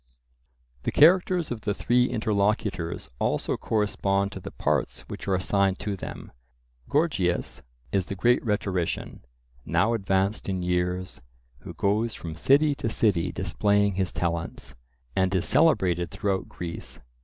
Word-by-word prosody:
The - - -2
characters 175 0 +4
of 115 -3 -4
the 105 -1 -1
three 125 +4 +3
interlocutors 100 - -1
also - - 0
correspond 100 -2 0
to - - -7
the - - -7
parts - - -1
which - - -9
are 95 - +2
assigned 95 0 +1
to 105 -2 -2
them. 95 - -8 0.6
Gorgias 140 - 0 0.3
is 95 -3 0
the 100 - -4
great 120 +6 +3
rhetorician, 100 -6 -2 0.4
now 90 - +2
advanced 100 -1 0
in 95 -2 -2
years, 90 +1 -1 0.4
who 85 +3 -10
goes 105 +6 0
from 80 -2 -7
city 140 - +4
to 115 - 0
city 100 -7 +1
displaying 100 -1 +1
his 95 -1 0
talents, 85 -1 -3 0.4
and 95 0 +2
is 90 - +1
celebrated 90 - +3
throughout 100 0 -2
Greece. 85 -1 -7
100 Hz, 135 wpm, -26 LUFS, 90-110 Hz, 0.6 s, characters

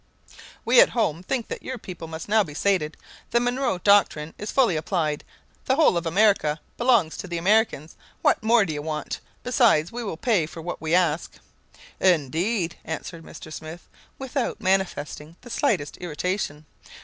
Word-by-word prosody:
"We - - +7
at - - +5
home 175 -8 +1
think 235 +5 -2
that - - -5
your 260 - -5
people 175 -6 -8
must 160 0 -7
now 215 +1 +4
be 150 -5 -10
sated. 175 -5 0 0.3
The 235 - +3
Monroe 245 -3 0
doctrine 175 -5 +3
is 210 - -6
fully 245 -10 +3
applied; 155 -2 -1 0.4
the 265 - +2
whole 310 - +4
of 170 -1 -1
America 165 -4 +3 0.2
belongs 235 -10 +3
to - - -6
the 175 -1 -3
Americans. 185 -4 +1 0.3
What - - +3
more 220 -1 +4
do 160 - -3
you 145 - -4
want? 150 0 -4 0.2
Besides, 235 - +3
we 240 +1 -5
will 195 -7 -4
pay 195 -7 +1
for 165 - -10
what 175 - -5
we 160 +1 +1
ask." 175 -3 +1 0.7
"Indeed!" 170 - +1
answered 165 +1 -6
Mr. 155 - -10
Smith, 160 +3 -9 0.3
without 265 -1 -3
manifesting 180 -5 -1
the 245 - -12
slightest 190 - 0
irritation. 175 -2 -3
180 Hz, 165 wpm, -24 LUFS, 160-220 Hz, 0.7 s, We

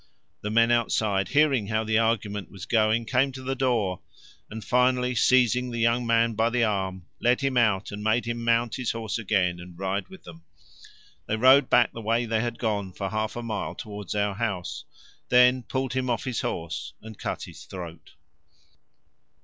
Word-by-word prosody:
The 105 - -3
men 115 +2 +3
outside, 110 -4 +1
hearing 135 -3 +2
how 110 +1 0
the 110 0 +1
argument 105 -4 -1
was 95 -1 -9
going, 110 0 +2
came 130 +4 +1
to 130 0 -8
the 135 +1 -2
door, 120 -9 0 0.5
and 110 0 -8
finally 125 0 +2
seizing 125 +1 +3
the 120 - -5
young 115 +1 +1
man 115 0 +3
by 115 +2 +1
the 120 0 +1
arm 95 -4 -2
led 125 +3 +2
him 135 -1 0
out 110 -5 +2
and 105 0 -6
made 110 +3 +1
him 120 0 -3
mount 115 0 +1
his 125 -3 -2
horse 115 0 -3
again 95 -5 0
and 90 -1 -11
ride 95 +2 -2
with 190 0 -14
them. 85 -1 -12 0.9
They 105 - 0
rode 130 +3 +6
back 120 -1 +4
the 115 - -7
way 115 +2 0
they 110 -1 0
had 120 0 -3
gone 100 -5 -2
for 95 +1 -4
half 110 0 -2
a 120 - -5
mile 110 -2 -4
towards 105 -2 -7
our 105 -1 0
house, 90 -9 -4 0.4
then 125 +1 +5
pulled 130 +1 -3
him 130 -1 -1
off 120 - -1
his 125 -4 -2
horse 80 -2 -4
and 110 -1 -11
cut - - -4
his - - -11
throat. 85 -4 -9
115 Hz, 190 wpm, -26 LUFS, 100-120 Hz, 0.9 s, rode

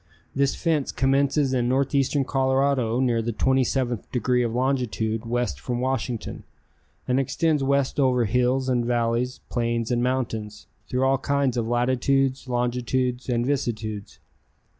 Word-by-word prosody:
This 140 0 +1
fence 160 -5 0
commences 135 +1 +1
in 120 -1 +1
northeastern 135 +1 +1
Colorado 130 -3 +1
near 120 -3 +2
the 115 +1 -2
27th 130 -1 0
degree 125 0 +1
of 120 -2 0
longitude 120 -3 -1
west 120 - -1
from 120 - -3
Washington, 125 -2 -3 0.7
and 125 +1 +2
extends 150 +2 +1
west 140 +1 +1
over 125 -3 +3
hills 125 +4 +1
and 125 -2 +1
valleys, 120 +1 0
plains 115 -1 -1
and 120 -1 +1
mountains, 115 -5 -2 0.2
through 125 +1 0
all 135 0 +3
kinds 140 -2 0
of 115 -2 -1
latitudes, 130 +3 +1
longitudes 125 +1 -1
and 120 -1 +1
vicissitudes. 110 -6 -3
125 Hz, 135 wpm, -24 LUFS, 120-135 Hz, 0.7 s, over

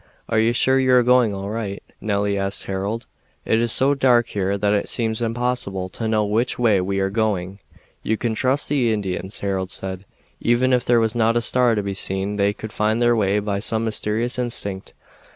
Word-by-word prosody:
"Are 110 - +2
you 115 +1 +3
sure 130 +2 +2
you 130 -1 +3
are 125 - +5
going 125 -2 +4
all 100 +1 -5
right?" 105 -3 -4 0.2
Nelly 100 -1 0
asked 95 0 0
Harold. 100 +4 -3 0.4
"It 110 - +2
is 120 -1 +2
so 135 +4 +4
dark 125 -4 +3
here 100 0 -1
that 100 +1 +1
it 105 - -1
seems 110 -1 -1
impossible 115 -5 -2
to 110 +4 -4
know 110 -1 +1
which 110 +5 0
way 110 -6 +3
we 95 +1 -2
are 95 0 0
going." 100 -3 -1 0.4
"You 110 - -1
can 115 0 -1
trust 130 +5 0
the 130 -5 +1
Indians," 95 -2 -3
Harold 95 -2 -2
said. 95 0 -5 0.4
"Even 125 +2 +2
if 125 -1 +2
there 120 -1 +4
was 110 -1 0
not 115 0 +2
a - - +4
star 125 -1 +3
to 105 - -1
be 100 0 -3
seen 95 +1 -1
they 100 0 +2
could 110 +1 -9
find 110 +2 0
their 120 0 +3
way 100 -2 +1
by 100 -1 -1
some 110 +2 -1
mysterious 110 +3 -1
instinct. 100 -6 -4
110 Hz, 205 wpm, -21 LUFS, 100-120 Hz, 0.4 s, are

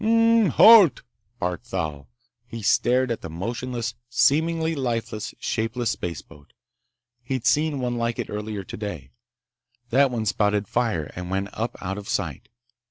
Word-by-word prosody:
"Hrrrmp, 230 -2 +4
halt!" 215 -8 +7 0.3
barked 90 +4 -3
Thal. 75 - -4 0.4
He 115 -2 -8
stared 125 +5 +2
at 115 - -3
the 80 - -7
motionless, 115 +6 -4 0.2
seemingly 160 +6 +2
lifeless, 115 -6 -3
shapeless 115 0 -1
spaceboat. 75 -4 -7 0.7
He'd 125 0 -4
seen 150 +1 +2
one 120 -1 -2
like 115 0 -1
it - - -3
earlier 105 -1 -4
today. 105 +2 -7 0.8
That 135 +3 +4
one 115 -3 -3
spouted 105 -1 +1
fire 110 -12 -1
and 90 0 -6
went 95 +1 -2
up 115 +2 -4
out 95 +1 -4
of 105 +1 -10
sight. 90 - -3
115 Hz, 140 wpm, -24 LUFS, 100-130 Hz, 0.8 s, halt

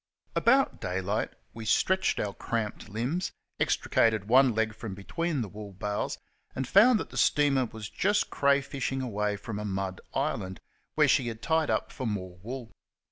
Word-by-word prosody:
About 265 +4 +3
daylight 95 +2 -1 0.2
we 115 - -7
stretched 190 +12 +2
our 100 -1 -1
cramped 110 0 -3
limbs, 125 - -2 0.3
extricated 110 -3 +2
one 125 0 +5
leg 110 0 +1
from 110 -2 -6
between 155 - -2
the - - -5
wool 105 0 -9
bales, 105 +2 -2 0.4
and 130 -1 -2
found 220 - +6
that - - -6
the - - -7
steamer 140 -3 +3
was 110 -2 -7
just 205 - +1
crayfishing 140 -1 +1
away 105 -3 -1
from 105 +1 -6
a - - -4
mud 95 -2 -3
island, 95 0 -1 0.4
where - - +5
she 125 - +3
had 115 -1 -6
tied 160 -1 +2
up - - 0
for 130 - -4
more 95 -4 -4
wool. 120 +2 -6
115 Hz, 165 wpm, -29 LUFS, 105-140 Hz, 0.4 s, found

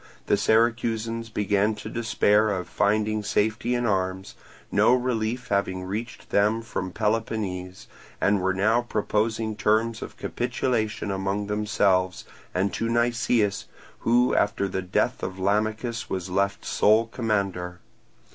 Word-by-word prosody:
The - - +3
Syracusans 115 +1 +1
began 105 0 +1
to 105 - -8
despair 110 -2 +2
of 95 -3 -2
finding 105 +1 +1
safety 110 +3 0
in 120 0 0
arms, 95 -2 -1 0.4
no 105 +5 +5
relief 125 -1 -2
having 95 -2 0
reached 105 +6 -6
them 105 +3 +2
from 95 -4 -4
Peloponnese, 105 -4 -2 0.3
and 100 -1 +2
were 95 +1 +1
now 110 +5 +3
proposing 110 -1 -1
terms 110 +2 +1
of - - -8
capitulation 120 -4 -1
among 95 +1 -1
themselves 100 -3 +1 0.3
and 95 +1 0
to 115 - -1
Nicias, 120 -3 +1 0.3
who 120 +2 +3
after 100 -1 +1
the 95 0 -3
death 90 0 0
of 95 0 -4
Lamachus 110 +4 -1
was 95 -1 -3
left 100 +1 0
sole 110 +2 +4
commander. 100 -7 -2
105 Hz, 130 wpm, -25 LUFS, 100-115 Hz, 0.4 s, no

